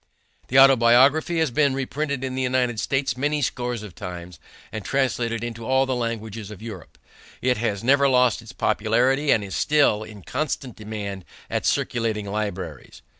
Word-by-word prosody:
The 130 - +1
Autobiography 135 +5 +5
has 160 -4 +1
been 140 0 +2
reprinted 135 +1 -3
in 130 -1 -3
the 130 - -2
United 125 -3 0
States 135 -1 0
many 145 +3 0
scores 120 -3 -2
of 105 -5 -9
times 90 -4 -8 0.3
and 110 - -5
translated 120 -4 -1
into 115 -1 -5
all 130 +3 +2
the 130 - -1
languages 110 -3 -4
of 105 - -10
Europe. 105 -8 -10 0.4
It 125 -1 +1
has 110 -2 -2
never 140 +2 +4
lost 125 -3 +3
its 115 +1 -11
popularity 125 +7 +1
and 110 - +4
is 100 - -6
still 145 -8 +3
in 105 -3 -10
constant 135 - -3
demand 105 -3 -6 0.3
at - - -1
circulating 110 -3 -1
libraries. 100 - -5
120 Hz, 165 wpm, -23 LUFS, 105-135 Hz, 0.4 s, Autobiography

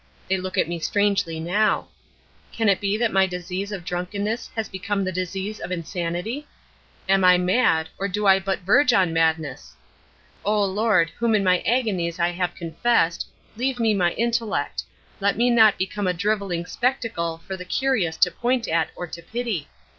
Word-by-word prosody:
They 190 - +2
look 185 0 -5
at - - +3
me 170 0 -4
strangely 200 -3 0
now. 200 +7 +1 0.6
Can 225 -2 +1
it 195 - +2
be 200 +1 0
that 230 -1 0
my 190 0 +4
disease 180 +2 -4
of 190 -4 -6
drunkenness 200 +6 -3
has 225 -2 -2
become 195 +1 -2
the 185 - -1
disease 190 +3 -4
of - - -6
insanity? 180 - -3 0.6
Am 195 0 +3
I 180 0 +7
mad, 180 -3 +2
or 200 - 0
do 205 +2 -2
I 195 -1 +6
but 195 0 -2
verge 250 +8 +4
on 185 -5 +3
madness? 160 -4 -1 0.7
O 210 0 +2
Lord, 200 -3 +2
whom 235 -2 +2
in 200 - +2
my 180 -1 +3
agonies 195 -9 0
I 170 0 +2
have 175 0 -2
confessed, 170 +1 0 0.3
leave 250 +2 -1
me 225 -2 +3
my 175 -4 +1
intellect 230 -9 -1 0.4
let 200 0 +1
me 245 +2 +3
not 220 -3 +6
become 190 +1 -2
a 180 - +1
drivelling 195 -2 -1
spectacle 225 -10 -2
for 190 - -4
the 180 - -7
curious 190 -6 0
to 180 - -6
point 240 +4 0
at 165 0 +1
or 175 - -5
to 170 0 -9
pity! 220 - -3
195 Hz, 175 wpm, -23 LUFS, 175-220 Hz, 0.7 s, I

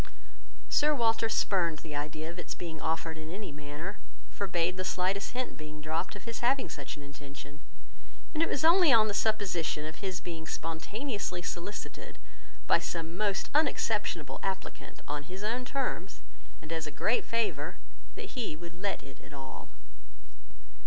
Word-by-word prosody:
Sir 300 0 +5
Walter 225 -2 +3
spurned 170 -7 +3
the 150 -2 -4
idea 155 +2 -2
of 175 - -8
its - - -4
being 160 -3 -5
offered 160 0 0
in 155 +1 -6
any 200 -1 -4
manner; 145 +7 -5 0.3
forbad 180 -2 +1
the 185 - -1
slightest 190 +3 +1
hint 255 0 -2
being 155 0 -7
dropped 155 +4 -1
of 205 - -8
his 230 -1 -4
having 255 -4 +3
such 145 0 -5
an 145 - -8
intention; 140 0 -9 0.7
and 310 - +2
it 330 - +4
was 290 - +1
only 340 -2 +8
on 220 -2 +8
the 205 - 0
supposition 195 -8 +1
of 155 +1 -5
his 190 -2 -2
being 165 -2 -5
spontaneously 180 - -2
solicited 180 +4 -4 0.5
by - - +6
some 165 0 -3
most 200 0 +1
unexceptionable 215 - +2
applicant, 190 0 -4
on 145 0 -1
his 185 +4 -6
own 240 +4 0
terms, 250 -9 -2 0.4
and 155 - -8
as 160 -2 0
a - - -4
great 210 +11 +3
favour, 180 -7 0 0.4
that - - -6
he 235 - -2
would 170 +2 -8
let 200 -1 0
it 135 - -12
at - - -13
all. 135 -2 -7
180 Hz, 165 wpm, -32 LUFS, 155-215 Hz, 0.7 s, only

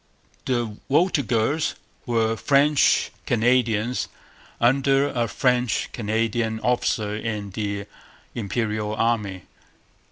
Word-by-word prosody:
The 120 -4 -1
Voltigeurs 140 - +1 0.3
were 115 -1 +1
French 140 +4 +3 0.2
Canadians 120 0 +1 0.5
under 135 +3 +3
a 120 -3 -1
French 125 +1 0
Canadian 110 0 -1
officer 110 -4 0
in 105 -2 -4
the 100 0 -3 0.5
Imperial 105 0 -2
Army. 105 -5 -1
115 Hz, 85 wpm, -24 LUFS, 105-125 Hz, 0.5 s, French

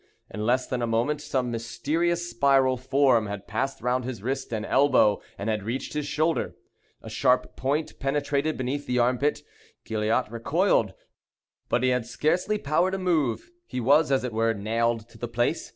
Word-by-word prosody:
In 105 +2 -3
less 130 +1 +2
than 125 -1 -3
a 120 - 0
moment 120 +7 0
some 130 -4 -1
mysterious 160 +10 -1
spiral 135 -2 +3
form 130 -3 +2
had 100 -1 -6
passed 135 +5 -2
round 125 +1 0
his 120 -5 -6
wrist 135 +1 -3
and 110 -2 -2
elbow, 135 -7 +3 0.2
and 100 - -4
had 110 -1 0
reached 120 +6 -4
his 150 -1 -2
shoulder. 155 +3 0 0.5
A - - -10
sharp 125 +2 +1
point 145 +4 -2
penetrated 145 +2 0
beneath 135 +3 -3
the 125 - 0
armpit. 130 +5 +1 0.4
Gilliatt 110 +3 0
recoiled; 120 - +1 0.7
but - - +1
he 130 - +4
had 125 -2 0
scarcely 175 +11 0
power 165 +2 +1
to 190 - -2
move! 170 - 0 0.2
He - - -4
was, 140 +5 +4
as 135 -1 +2
it 125 -3 -3
were, 115 0 +1
nailed 115 +2 -1
to 115 - -17
the 120 - -3
place. 120 +1 -1
130 Hz, 175 wpm, -26 LUFS, 115-145 Hz, 0.7 s, he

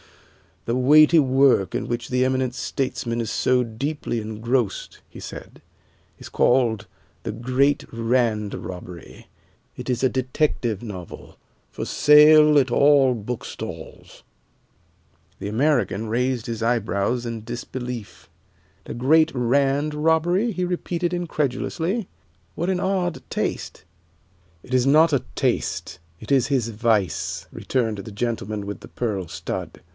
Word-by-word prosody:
"The 115 - -1
weighty 150 +5 +6
work 130 - +3
in - - -2
which 120 0 -3
the 125 0 +2
eminent 130 -1 0
statesman 120 -3 -3
is 115 -3 -2
so 125 0 +2
deeply 120 +2 -3
engrossed," 110 +1 -2
he - - -12
said, - - -10 0.6
"is - - -10
called 115 -4 +2 0.4
'The 115 - -3
Great 130 +5 +1
Rand 115 -3 0
Robbery.' 90 -2 -9 0.5
It - - -7
is 125 0 -1
a 130 - +4
detective 130 - -1
novel, 95 -7 -9 0.3
for - - -5
sale 150 0 +6
at 130 -2 +1
all 135 0 +4
bookstalls." 115 +2 -7 1.2
The - - -5
American 115 - +1
raised 125 +1 -1
his 115 -1 -5
eyebrows 115 0 0
in 115 -2 -5
disbelief. 120 0 -7 0.6
"'The - - -6
Great 155 +6 +4
Rand 140 +4 +1
Robbery'?" 165 +8 +2
he 180 -2 -2
repeated 175 -1 -2
incredulously. 170 - -2 0.5
"What 170 +3 -2
an 185 -1 0
odd 185 -3 -1
taste!" - - -3 0.8
"It 130 - -3
is 125 0 +3
not 155 +4 +5
a 135 - +1
taste, - - -1 0.2
it 110 - -9
is 135 -3 +3
his 130 -5 0
vice," 110 -4 -1
returned 115 -5 -2
the 110 - -8
gentleman 105 -2 -3
with 100 - -5
the - - -11
pearl 100 -7 -3
stud. - - -6
125 Hz, 130 wpm, -23 LUFS, 115-150 Hz, 1.2 s, weighty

